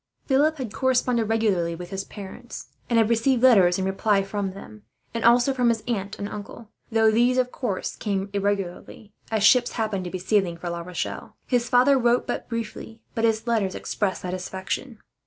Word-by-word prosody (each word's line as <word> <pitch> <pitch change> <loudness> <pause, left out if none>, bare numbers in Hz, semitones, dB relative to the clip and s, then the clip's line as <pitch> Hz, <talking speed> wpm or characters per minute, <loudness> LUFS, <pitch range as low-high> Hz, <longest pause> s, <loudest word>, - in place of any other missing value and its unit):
Philip 300 +3 +2
had 245 -6 -5
corresponded 250 -4 +1
regularly 195 -7 +1
with 175 +2 -9
his 195 0 -4
parents, 215 +4 -9 0.2
and 235 - +2
had 225 -2 +4
received 235 +2 +2
letters 190 -9 +6
in 190 - -1
reply 195 +1 +1
from 195 -1 -3
them, 105 - -11 0.3
and 230 - -3
also 240 +3 +5
from 250 -2 +2
his 225 -2 0
uncle 205 -3 -2
and 200 - -4
aunt; 210 +2 -9 0.2
though 220 -1 +4
these 240 +3 +3
of 250 -1 +1
course 210 -8 -3
came 195 -2 -2
irregularly, 200 +1 -3 0.2
as 220 -2 0
ships 245 +3 +5
happened 215 -5 -2
to - - -4
be 185 - -4
sailing 185 -2 0
for 175 0 -5
La 170 0 -4
Rochelle. 180 +1 -5
His 245 -1 0
father 265 +2 +5
wrote 240 0 +2
but - - -4
briefly, 225 -1 -6
but 230 -1 0
his 220 0 +1
letters 215 -6 0
expressed 200 -3 -2
satisfaction. 190 +6 -4
220 Hz, 185 wpm, -24 LUFS, 195-240 Hz, 0.3 s, letters